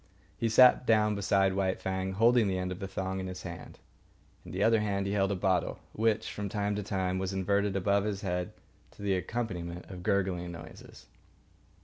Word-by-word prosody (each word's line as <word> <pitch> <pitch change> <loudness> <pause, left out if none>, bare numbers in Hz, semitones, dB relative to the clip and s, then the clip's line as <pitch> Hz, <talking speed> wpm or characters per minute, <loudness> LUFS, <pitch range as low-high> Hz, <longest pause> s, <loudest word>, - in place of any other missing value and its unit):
He 115 - -1
sat 125 +2 +6
down 105 -1 +4
beside 100 -1 +2
White 95 -1 0
Fang, 95 0 -2
holding 115 +2 +4
the 95 -1 0
end 90 0 -2
of 90 - -5
the 95 - -4
thong 95 0 -3
in 95 - -4
his 90 -1 -7
hand. 85 -2 -8 0.7
In - - -10
the 95 +2 -1
other 115 0 +4
hand 100 -2 -1
he 100 - -2
held 95 -1 +1
a - - 0
bottle, 90 -2 0 0.2
which, 110 0 0
from 100 -1 -4
time 105 -1 -1
to - - -1
time, 95 -2 -1
was 95 0 -2
inverted 100 +1 +1
above 100 +1 +2
his 100 -2 -2
head 90 -2 -2 0.4
to - - -12
the 100 -1 +1
accompaniment 90 -4 -3
of 90 -1 -8
gurgling 90 -2 0
noises. 80 -1 -12
95 Hz, 200 wpm, -30 LUFS, 95-105 Hz, 0.7 s, sat